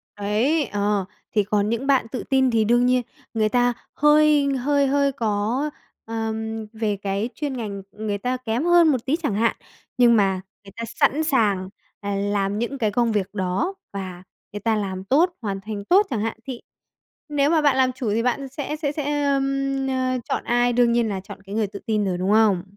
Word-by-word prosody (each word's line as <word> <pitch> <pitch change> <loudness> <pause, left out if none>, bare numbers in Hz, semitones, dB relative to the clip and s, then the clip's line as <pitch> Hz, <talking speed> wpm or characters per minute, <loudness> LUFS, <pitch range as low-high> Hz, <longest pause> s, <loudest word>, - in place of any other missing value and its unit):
Ấy, 225 +10 +1
ờ, 205 -1 0 0.3
thì 210 -2 +2
còn 205 +1 0
những 235 +4 -2
bạn 265 -5 +3
tự 255 - -4
tin 265 -1 +3
thì 225 -1 +3
đương 240 +2 +3
nhiên 250 0 +3 0.3
người 215 -1 +1
ta 245 0 +2 0.2
hơi 295 -1 +4
hơi 280 +2 +2
hơi 280 0 +2
có, 230 +4 -1 0.4
ờm, 220 0 -3
về 215 -2 -1
cái 200 +3 -2
chuyên 285 -4 -3
ngành 200 -4 -5
người 210 -1 -3
ta 250 +4 -2
kém 245 +1 -2
hơn 345 -1 +6
một 260 -5 +1
tí 275 - +2
chẳng 300 - -2
hạn, 230 +2 +2 0.4
nhưng 240 -1 +6
mà 195 -3 +2 0.2
người 195 - -13
ta 230 - -4
sẵn 285 +4 +1
sàng, 205 - +1 0.3
à, 200 -1 -3
làm 200 +1 -1
những 240 +4 -2
cái 220 -5 0
công 235 +1 +1
việc 205 -1 -1
đó 190 - -1 0.2
và 185 -2 -6 0.3
người 205 - -4
ta 225 +2 +1
làm 190 -3 -3
tốt, 320 - +3
hoàn 195 -3 -3
thành 205 -1 -6
tốt 400 +4 +5
chẳng 225 -5 -1
hạn, 225 0 -2
thì 255 -3 -6 0.7
nếu 290 -1 +2
mà 320 -2 +3
bạn 285 -3 +4
làm 260 -1 +3
chủ 245 -4 -3
thì 230 - +1
bạn 265 +2 -1
sẽ 290 +3 -4
sẽ 295 -2 -2
sẽ, 290 -1 -1
ờm, 275 -1 0
ờ, 255 -1 0
chọn - - -1
ai, 240 0 +2
đương 240 -1 +3
nhiên 235 -2 +2
là 195 -2 -3
chọn 200 0 -11
cái 195 +1 -8
người 220 -1 +1
tự 200 0 -8
tin 215 -2 +1
rồi, 180 -2 -1
đúng 190 +3 +1
không? 210 -5 +4
230 Hz, 210 wpm, -23 LUFS, 205-275 Hz, 0.7 s, hơn